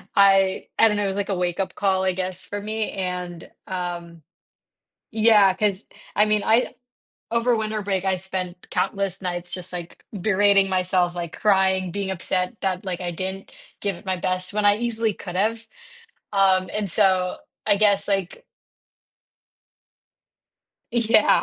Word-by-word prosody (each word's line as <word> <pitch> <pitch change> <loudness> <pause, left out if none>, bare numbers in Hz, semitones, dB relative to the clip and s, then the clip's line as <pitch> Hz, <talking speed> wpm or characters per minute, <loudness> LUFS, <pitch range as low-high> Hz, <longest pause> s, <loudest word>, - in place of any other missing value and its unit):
I 195 -1 +4
I 225 - +7
don't 210 -1 0
know, 205 - 0
it - - +1
was, 195 - -2
like, 200 - -7
a 195 - +1
wake-up 180 +1 -1
call, 190 -2 +1
I 185 -1 +2
guess, 185 0 -3
for 205 0 -5
me, 215 +1 -2
and 180 -3 -4 0.2
um 175 -2 -5 0.9
Yeah, 215 -3 +5
'cause 200 0 0 0.3
I 210 - +6
mean 210 -1 +2
I 230 +3 +2 0.6
over 235 +1 +2
winter 215 -1 -2
break 195 -2 -1
I 190 -1 +1
spent 185 -1 -5
countless 195 -1 -1
nights 175 -1 -4
just, 180 0 -5
like, 175 -1 -8 0.2
berating 200 0 +4
myself, 185 -1 +1
like, 170 -2 -5
crying, 190 -3 +3
being 200 0 -2
upset 185 +2 -2
that, 190 -1 -1
like, 180 -1 -3
I 175 -1 -3
didn't 190 +3 -5 0.3
give 200 -1 -1
it 175 - -16
my 185 -1 0
best 185 +1 -2
when 210 0 -1
I 205 0 +5
easily 230 -2 0
could 180 -2 -7
have, 225 +4 0 0.7
um, 190 -2 +3
and 210 -3 -2
so, 185 -1 +2 0.3
I 205 -2 +4
guess, 200 -1 +3
like 195 - -2 2.5
Yeah, 230 -2 +4
190 Hz, 155 wpm, -23 LUFS, 185-205 Hz, 2.5 s, I